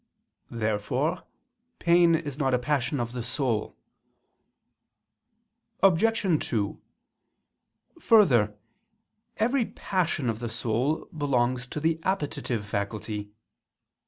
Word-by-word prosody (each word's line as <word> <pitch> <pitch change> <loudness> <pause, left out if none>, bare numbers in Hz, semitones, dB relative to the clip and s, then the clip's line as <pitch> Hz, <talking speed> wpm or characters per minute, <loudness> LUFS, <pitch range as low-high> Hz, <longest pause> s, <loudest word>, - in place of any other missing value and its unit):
Therefore 120 - -1 0.5
pain 170 -1 +4
is 150 -4 -3
not 135 -3 +2
a - - +3
passion 130 0 -1
of 120 -1 -2
the 125 0 -4
soul. 120 -2 -2 2.1
Obj. 215 +5 +4 0.2
2: 105 -4 -2 1.2
Further, 125 - +4 0.8
every 240 +3 +2
passion 170 -7 -1
of 115 -1 -1
the 120 -1 -4
soul 120 +8 -1
belongs 125 -4 0
to 150 - -5
the 160 +1 +1
appetitive 140 - -2
faculty. 105 +1 -4
130 Hz, 95 wpm, -27 LUFS, 115-165 Hz, 2.1 s, pain